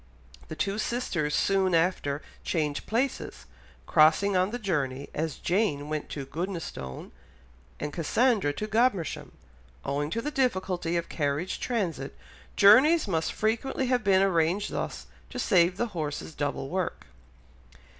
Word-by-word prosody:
The 155 - -6
two 200 +5 -1
sisters 170 -11 -1
soon 190 -1 +2
after 165 -4 0 0.2
changed 150 -4 -1
places, 250 +5 -2 0.4
crossing 165 +6 +4
on 185 +1 +3
the 240 - -3
journey, 145 - -2
as 160 -1 -2
Jane 175 -7 0
went 155 -1 -3
to 140 -2 -5
Goodnestone 165 - -5 0.7
and 150 - -4
Cassandra 205 - +2
to 210 - -4
Godmersham; 215 - 0 0.5
owing 145 +1 -1
to 225 - -2
the 295 +6 -3
difficulty 185 - 0
of 170 - -2
carriage 145 +4 -2
transit, 170 - -2 0.4
journeys 260 +10 +6
must 165 -4 0
frequently 230 +5 -1
have 245 -3 +1
been 195 -2 +4
arranged 180 +2 +1
thus - - -4 0.2
to 255 - -8
save 185 -6 +3
the 240 +2 -1
horses 155 -1 -4
double 145 -2 -3
work. 185 0 -3
180 Hz, 135 wpm, -28 LUFS, 150-215 Hz, 0.7 s, journeys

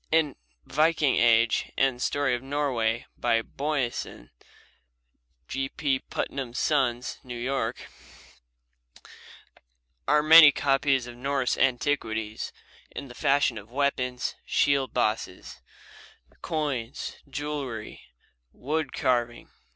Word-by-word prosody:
In 155 -3 +2 0.3
"Viking 155 -1 +2
Age" 115 -1 +3
and 130 -2 +1
"Story 145 -1 +1
of 120 - -2
Norway," 130 -5 -1
by 115 -1 +2
Boyesen 135 - -3 1.2
(G. 135 0 -3
P. 140 -3 -1
Putnam's 130 -3 -5
Sons, 130 -5 0
New 125 -2 -7
York), 130 +3 -3 2.2
are 150 0 +4
many 155 -1 +10
copies 135 -2 +1
of 120 -1 -9
Norse 135 0 0
antiquities 115 -5 -1 0.4
in 140 - -8
the - - -10
fashion 135 -3 +1
of 105 +1 -15
weapons, 125 -2 -1
shield 140 -2 +1
bosses, 110 -6 -2 0.8
coins, 145 -7 -3
jewelry, 140 -6 -5 0.5
wood 150 +1 -3
carving. 120 -2 -1
135 Hz, 95 wpm, -27 LUFS, 120-145 Hz, 2.2 s, many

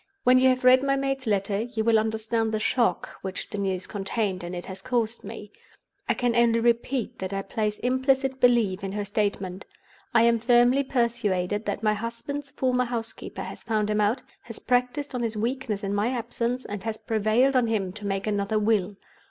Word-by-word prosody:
When 255 0 +6
you 260 0 +5
have 255 0 +1
read 255 +1 +7
my 275 0 +1
maid's 270 -2 -2
letter, 200 0 +1
you 225 -1 -3
will 225 -1 +4
understand 220 +1 -1
the 215 - -1
shock 225 -4 0
which 190 -1 -6
the 205 - -4
news 190 -2 -1
contained 195 -2 -2
in 175 +1 -5
it 175 - -6
has 190 0 -7
caused 235 0 -1
me. 210 -1 -9 0.6
I - - +3
can 245 -2 0
only 235 -1 +4
repeat 235 +1 0
that 190 +1 -4
I 195 0 -2
place 210 -1 -2
implicit 260 +1 +1
belief 230 -7 +3
in 195 0 -3
her 205 0 -2
statement. 200 -2 -2 0.5
I 230 -2 +5
am 235 0 +4
firmly 245 +3 +4
persuaded 220 -6 0
that 205 +1 -3
my 215 -1 +3
husband's 235 +6 -5
former 255 -2 0
housekeeper 230 -2 -5
has - - -8
found 215 -2 0
him 210 0 +1
out, 210 +4 +1 0.2
has 230 - -9
practiced 250 +3 0
on 250 - -2
his 225 -2 -2
weakness 225 -2 -2
in 200 0 -1
my 205 +2 +1
absence, 245 0 -2
and 205 -1 -5
has 220 +1 -3
prevailed 225 +5 +2
on 250 -2 +3
him 200 -5 -1
to 210 -1 -7
make 195 0 -2
another 205 0 0
Will. 210 -2 +1
225 Hz, 195 wpm, -26 LUFS, 205-245 Hz, 0.6 s, read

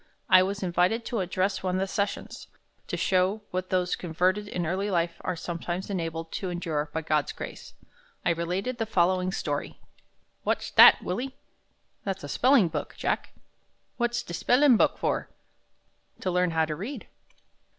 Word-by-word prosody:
I 185 - +9
was 200 +2 -2
invited 180 +6 +1
to 235 - -2
address 185 +1 -1
one 185 -1 -1
of - - 0
the 190 - +1
sessions. 200 +1 -3 0.4
To - - -3
show 190 +3 +1
what 185 0 -3
those 180 -1 +1
converted 185 +5 0
in 180 -4 -3
early 190 +5 -1
life 170 -2 0
are 185 - -2
sometimes 175 +3 -4
enabled 165 -3 -3
to 190 - -3
endure 160 -4 -2
by 160 +1 -3
God's 150 -1 +1
grace, - - -9 0.5
I - - +4
related 180 +9 -2
the 225 - -1
following 185 -2 +2
story: 145 -6 -3 0.6
"What's - - -1
dat, - - +8
Willie?" 250 +9 -3 0.7
"That's 195 -1 -3
a 145 - -6
spelling 255 - +4
book, 160 - -5
Jack." - - -1 0.7
"What's 240 0 0
de 170 - -8
spellin' 250 - +4
book - - +3
for?" - - -1 0.9
"To 185 - -1
learn 180 0 +2
how 160 -1 +2
to 155 -1 -4
read." 215 - -6
185 Hz, 160 wpm, -27 LUFS, 170-200 Hz, 0.9 s, I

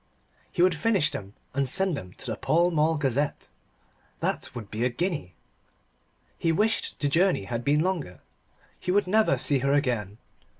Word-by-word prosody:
He 175 - +2
would 185 0 +5
finish 165 -2 +1
them 100 0 -7 0.2
and 135 -1 0
send 190 +3 +1
them 90 -9 -8
to - - -10
the - - -2
Pall 170 +3 +2
Mall 160 0 +2
Gazette. 140 0 -1 0.7
That - - -1
would 110 -4 -7
be 110 +2 -2
a 125 - +3
guinea. 145 - -3 1.0
He 165 - +2
wished 215 +7 0
the 145 - +1
journey 170 - +2
had 115 +4 -4
been 145 +3 +3
longer. 170 - -2 0.6
He - - -6
would 200 +3 +3
never 215 +4 +3
see 140 -2 +4
her 140 +2 +1
again. 120 -8 0
150 Hz, 170 wpm, -27 LUFS, 120-180 Hz, 1.0 s, would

